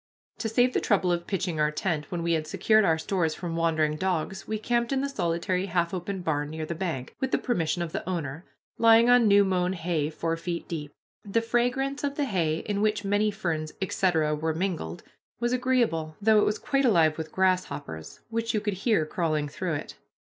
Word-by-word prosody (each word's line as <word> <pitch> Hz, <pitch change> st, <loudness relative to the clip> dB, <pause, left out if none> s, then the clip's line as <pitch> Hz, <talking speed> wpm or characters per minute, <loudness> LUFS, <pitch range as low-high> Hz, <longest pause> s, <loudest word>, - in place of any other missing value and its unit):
To 225 Hz, -, -1 dB
save 245 Hz, +3 st, +3 dB
the -, -, +1 dB
trouble 190 Hz, -4 st, +2 dB
of 170 Hz, 0 st, -1 dB
pitching 185 Hz, -5 st, -2 dB
our 150 Hz, 0 st, +3 dB
tent, 150 Hz, -1 st, -2 dB
when 175 Hz, -2 st, -3 dB
we 170 Hz, 0 st, +1 dB
had 155 Hz, -1 st, -1 dB
secured 215 Hz, +7 st, +3 dB
our 160 Hz, -4 st, +3 dB
stores 160 Hz, -1 st, -1 dB
from 170 Hz, -2 st, -4 dB
wandering 160 Hz, -2 st, +1 dB
dogs, 190 Hz, +2 st, -2 dB
we 215 Hz, -, -1 dB
camped 235 Hz, +2 st, 0 dB
in 270 Hz, -1 st, +1 dB
the 280 Hz, -, 0 dB
solitary 180 Hz, -4 st, -1 dB
half 170 Hz, -1 st, 0 dB
open 185 Hz, +1 st, -4 dB
barn 150 Hz, -3 st, -1 dB
near 160 Hz, 0 st, -4 dB
the 170 Hz, -, -3 dB
bank, 160 Hz, -7 st, -4 dB
with 265 Hz, -, -1 dB
the -, -, +2 dB
permission 175 Hz, -7 st, -1 dB
of 165 Hz, -, -5 dB
the 180 Hz, -, -4 dB
owner, 160 Hz, -3 st, -3 dB, 0.4 s
lying 230 Hz, +1 st, +6 dB
on 245 Hz, -2 st, +6 dB
new 200 Hz, 0 st, +6 dB
mown 185 Hz, -1 st, +1 dB
hay 165 Hz, -4 st, -1 dB
four 165 Hz, +1 st, -2 dB
feet 170 Hz, 0 st, -4 dB
deep. 150 Hz, -3 st, -5 dB, 0.3 s
The 205 Hz, +2 st, +1 dB
fragrance 245 Hz, +5 st, 0 dB
of 285 Hz, 0 st, -1 dB
the 290 Hz, -, 0 dB
hay, 165 Hz, -, 0 dB
in 205 Hz, -1 st, -1 dB
which 210 Hz, -1 st, +1 dB
many 205 Hz, +2 st, +2 dB
ferns, 165 Hz, -7 st, -3 dB
etc., 175 Hz, -5 st, +1 dB
were 160 Hz, +1 st, -1 dB
mingled, 165 Hz, -, -3 dB, 0.4 s
was 240 Hz, +1 st, 0 dB
agreeable, 235 Hz, -12 st, +1 dB
though 215 Hz, 0 st, +5 dB
it -, -, +3 dB
was 210 Hz, -, 0 dB
quite 275 Hz, -2 st, 0 dB
alive 165 Hz, -, +3 dB
with 160 Hz, -1 st, -5 dB
grasshoppers 180 Hz, -, -1 dB
which 230 Hz, 0 st, -1 dB
you -, -, +3 dB
could 210 Hz, -1 st, -2 dB
hear 210 Hz, -10 st, +2 dB
crawling 155 Hz, -2 st, -1 dB
through 165 Hz, +3 st, -3 dB
it. 150 Hz, -, -7 dB
180 Hz, 205 wpm, -27 LUFS, 160-215 Hz, 0.4 s, lying